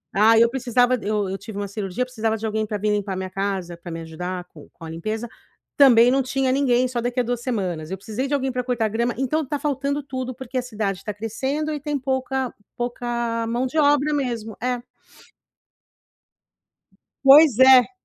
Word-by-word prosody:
Aí 225 +2 +6
eu 235 - +5
precisava 245 0 +2
eu 210 -1 -1
eu 195 - -3
tive 215 -1 -9
uma 205 - -3
cirurgia, 200 +3 -3
precisava 225 -3 -2
de 225 - -5
alguém 215 0 -1
pra 210 - -3
vim 210 +1 0
limpar 200 -2 -1
minha 190 0 -4
casa 195 -3 -3
pra 170 0 -9
me 165 - -5
ajudar 180 +3 -5
com - - -14
com 165 - -12
a - - -7
limpeza, 215 +8 -4 0.5
também 245 -2 +7
não 270 +1 +3
tinha 265 0 0
ninguém; 255 -2 +2
só 245 -1 -2
daqui 245 +1 -2
a - - -1
2 245 0 -2
semanas. 185 - -3
Eu - - -1
precisei 220 +7 -4
de 285 - -3
alguém 265 -1 -1
pra 250 0 -2
cortar 235 -4 0
grama 235 +3 -1
então, 275 +4 0
tá 290 +3 -2
faltando 285 0 -1
tudo, 255 -2 -5
porque 260 0 -6
a - - -1
cidade 210 -5 -3
tá 210 - -3
crescendo 265 +9 -3
e 300 - -3
tem 295 -1 -2
pouca 260 -1 -2 0.2
pouca 240 -1 -2
mão 240 +3 -1
de 310 +5 -1
obra 290 0 +3
mesmo. 235 -6 -3
É. 250 -1 -1 2.4
Pois 275 -2 +8
é. 260 +2 +7
240 Hz, 195 wpm, -23 LUFS, 210-260 Hz, 2.4 s, Pois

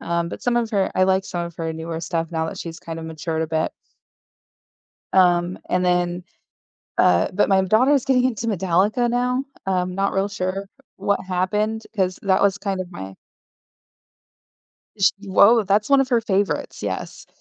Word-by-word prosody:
um, 170 0 -1
but - - -8
some 245 -1 +1
of 235 -1 0
her 200 -3 +1
I 185 - +4
like 190 0 +2
some 175 -2 -4
of 170 -1 -12
her 165 -1 -3
newer 160 0 -5
stuff 165 -1 -3
now 160 -1 -1
that - - -6
she's 165 0 -7
kind 165 -1 -7
of 160 - -7
matured 160 0 -3
a - - -2
bit. 160 0 -1 1.4
Um, 175 -1 +3
and 180 0 +1
then, 175 0 0 0.7
uh 85 -1 +4
but 205 - +2
my 190 -1 +4
daughter's 255 +8 +3
getting 255 -2 +3
into 240 -2 -1
Metallica 200 +4 +1
now. 250 +2 0 0.2
I'm 180 -1 0
not 195 +1 0
real 195 +1 0
sure 195 0 -3 0.3
what 200 - 0
happened 210 +4 -1
'cause 185 -2 0
that 190 -1 +2
was 200 0 +2
kind 195 -2 -3
of 180 - -13
my 95 - -8 1.8
She 200 +1 +4
Whoa, 205 +4 +5
that's 205 +5 +1
one 275 -1 +6
of 270 - 0
her 240 -3 +3
favorites, 200 -2 -1
yes. - - -5
190 Hz, 175 wpm, -22 LUFS, 175-210 Hz, 1.8 s, one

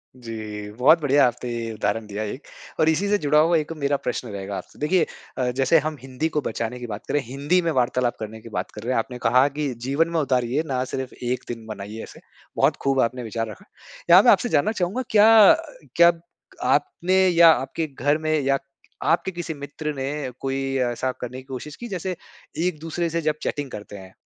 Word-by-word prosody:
जी, 110 -4 -7
बहुत 140 +9 +4
बढ़िया 145 -1 +4
आपने 120 -1 -4
उदाहरण 105 +1 -2
दिया 105 +1 -4
1 115 +7 -7 0.3
और 155 - +4
इसी 175 +6 +1
से 205 - +3
जुड़ा 150 -4 +3
हुआ 165 +2 +4
1 155 0 -3
मेरा 140 0 +2
प्रश्न 125 -1 -4
रहेगा 100 -1 -5
आपसे। - - -10
देखिए 165 +4 +2 0.3
अ, 125 -1 0
जैसे 135 +5 +3
हम 155 0 -4
हिंदी 135 +4 -3
को 150 -1 -1
बचाने 115 0 -4
की 120 - -6
बात 105 -1 -7
करें, 145 - +1
हिंदी 140 +9 0
में 170 - 0
वार्तालाप 125 -2 +1
करने 110 0 -7
की 115 - -11
बात - - -4
कर 105 - -9
रहे 125 +2 -1
हैं, - - +1
आपने 125 +2 -4
कहा 125 +3 +4
कि 145 -2 -3
जीवन 145 +5 +2
में 170 - 0
उतारिए 130 0 +1
ना 130 -2 -1
सिर्फ़ 130 0 -5
1 125 +1 -1
दिन 115 -2 -6
मनाइए 105 +1 -7
ऐसे। - - -12 0.4
बहुत - - +3
खूब 135 -1 +1
आपने 125 +1 -1
विचार 115 0 -3
रखा। 105 - -11 0.4
यहाँ 180 +3 +9
मैं 245 - +7
आपसे 245 - +2
जानना 160 +8 +2
चाहूँगा 200 +3 -1
क्या 215 0 +8 0.4
क्या 170 0 +7 0.6
आपने 170 +5 +1
या 170 -2 +7
आपके 145 +3 -1
घर 145 +2 0
में 155 0 -2
या 135 -1 +2 0.5
आपके 190 - +1
किसी 175 -2 -5
मित्र 150 +1 -5
ने 135 0 -3 0.3
कोई 135 0 -2 0.3
ऐसा 130 +2 -2
करने 125 +1 -5
की 130 - -9
कोशिश 135 +3 -7
की 240 - -8
जैसे 185 -1 -3 0.5
एक-दूसरे 165 0 -3
से 170 +1 -1
जब 155 -1 0
चैटिंग 145 -3 -3
करते 105 -1 -8
हैं 95 -1 -12
135 Hz, 205 wpm, -23 LUFS, 120-160 Hz, 0.6 s, यहाँ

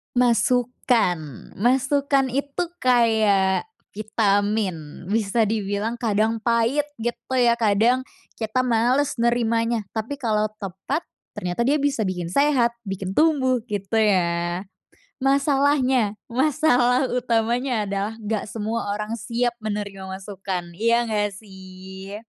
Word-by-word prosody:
Masukan. 235 - +1
Masukan 270 +4 +2
itu 280 +5 -2 0.2
kayak 220 -6 +3 0.3
vitamin. 205 -6 -1
Bisa 215 +1 +1
dibilang 210 +1 -2
kadang 220 -1 +1
pahit, 235 +5 +2 0.2
gitu 240 +1 -2 0.2
ya. 240 -1 +4
Kadang 230 +3 +2 0.3
kita 220 +2 -2
malas 255 +4 +2
nerimanya. 230 -2 +1
Tapi 230 +6 -3
kalau 215 -4 0
tepat, 195 - -4 0.2
ternyata 180 +6 -2
dia 285 +5 +2
bisa 275 -5 0
bikin 180 -3 -3
sehat, 250 - +2
bikin 195 -1 -5
tumbuh, 260 -6 +2
gitu 200 +1 -3
ya. 180 -3 +1 0.5
Masalahnya, 270 -4 +2 0.2
masalah 255 -1 +2
utamanya 235 -2 0
adalah 200 +2 -2
enggak 215 0 -2
semua 215 0 -3
orang 210 +2 -4
siap 235 +3 -1
menerima 205 -3 -5
masukan, 190 -2 -5
iya 230 +2 +3
enggak 210 -3 -1
sih? 190 -1 -11
225 Hz, 110 wpm, -23 LUFS, 200-250 Hz, 0.5 s, ya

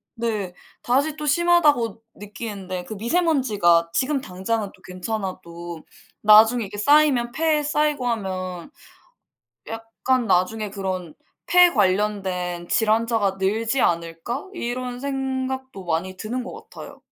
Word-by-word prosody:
네. 215 -6 -2 0.3
다시 285 +5 +1
또 300 - -5
심하다고 295 - +3
느끼는데 200 -3 -6
그 215 - -7
미세먼지가 220 - +2
지금 275 +1 +1
당장은 200 +2 -3
또 185 - -26
괜찮아도 180 -3 -6 0.4
나중에 220 +2 +6
이게 205 +1 -9
쌓이면 270 -1 +4
폐에 310 +1 +1
쌓이고 295 -3 0
하면 185 -4 -3 1.0
약간 225 +2 -2
'나중에 210 +4 +1
그런 185 -4 -4 0.3
폐 355 -1 +6
관련된 185 -4 0
질환자가 220 -3 +2
늘지 225 +6 +1
않을까?' 170 - -2
이런 245 -3 -4
생각도 265 -4 -3
많이 175 +3 -2
드는 240 +5 -4
것 - - -10
같아요. - - -11
220 Hz, 265 characters per minute, -23 LUFS, 185-260 Hz, 1.0 s, 나중에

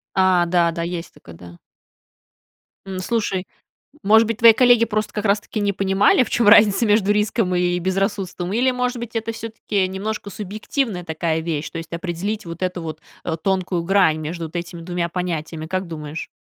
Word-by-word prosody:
А, 185 -2 +4
да, 170 -1 +2
да, 170 0 -4
есть 170 0 -5
такое, 85 - -14
да. 85 +1 -13 1.3
М, 190 -1 -5
слушай, 195 -2 -2 0.6
может 220 +2 +5
быть, 225 0 -3
твои 230 -2 +8
коллеги 245 -1 +5
просто 215 -1 -2
как 210 - -4
раз 205 0 +3
таки 215 - -5
не 205 -1 +1
понимали, 195 +5 +3
в - - -10
чем 235 -3 +2
разница 210 +1 +6
между 205 -1 +3
риском 210 -2 0
и 180 0 +1
безрассудством, 190 0 -2
или, 250 +4 +2
может 250 0 -1
быть, 235 0 -7
это 225 0 -2
всё-таки 215 -3 -2
немножко 200 +2 -4
субъективная 210 0 -3
такая 160 0 -1
вещь, 160 -2 -3
то 165 - -6
есть 165 0 -8
определить 185 +5 -3
вот 170 +1 -8
эту 180 -1 -2
вот, 160 -1 -6 0.2
э, 160 - -2
тонкую 185 -2 0
грань 175 -4 +3
между 165 +2 -5
вот 160 +2 -8
этими 170 0 -5
2 175 0 -2
понятиями, 165 -3 -4
как 185 +2 -2
думаешь? 155 -1 -6
185 Hz, 185 wpm, -21 LUFS, 170-210 Hz, 1.3 s, твои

